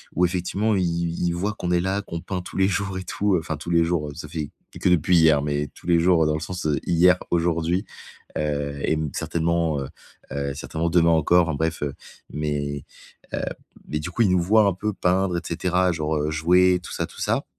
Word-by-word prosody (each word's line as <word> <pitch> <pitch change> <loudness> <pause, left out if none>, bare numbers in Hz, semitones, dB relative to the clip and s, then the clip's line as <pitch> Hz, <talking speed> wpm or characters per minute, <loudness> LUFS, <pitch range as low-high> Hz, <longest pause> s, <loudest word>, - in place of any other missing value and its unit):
où 90 - +4
effectivement 95 +4 0
i 95 - +1
ils 85 0 -1
voient 100 +5 -1
qu'on 90 -4 -3
est 90 - +3
là, 95 +2 -1
qu'on 85 -4 -6
peint 95 -2 -4
tous 90 - -9
les 95 - +4
jours 95 -1 -1
et 95 - -4
tout, 100 0 0
heu, - - +2
enfin 80 -2 -4
tous 80 +3 -8
les 85 -1 +4
jours, 80 -3 -1
heu, - - -8
ça 80 - -7
fait 75 -3 -4 0.3
que - - +2
depuis 90 +1 +4
hier, 80 -3 +5
mais 75 0 -1
tous - - -17
les 85 -1 +4
jours, 85 -1 +4
heu, - - +2
dans 75 - +1
le - - -2
sens, 90 +1 -5
heu, 75 -3 +1
hier, 90 +2 +5
aujourd'hui, 85 +3 +1 0.5
heu 70 -1 -2
et 80 - +2
mmh, 75 -3 -2
certainement, 85 -2 0
heu 65 - -4 0.4
heu, 70 0 -2
certainement 80 +3 -2
demain 85 -1 +4
encore, 85 +2 +4
enfin 75 - -1
bref, 80 0 -1
heu, 70 - -2 0.4
mais 70 -2 -2 0.5
heu, - - -1 0.5
mais 75 - -2
du 90 - -4
coup 115 - -1
ils 100 - +3
nous 90 -1 +3
voient 105 +5 +4
un 100 - +2
peu 105 +3 -3
peindre 90 -1 +1
et - - -2
cetera, 90 +2 +1
genre, 80 -2 -1
heu, 75 +1 -1
jouer, 90 +4 +4
tout - - -9
ça, - - -1
tout - - -12
ça - - 0
85 Hz, 235 wpm, -24 LUFS, 75-90 Hz, 0.5 s, hier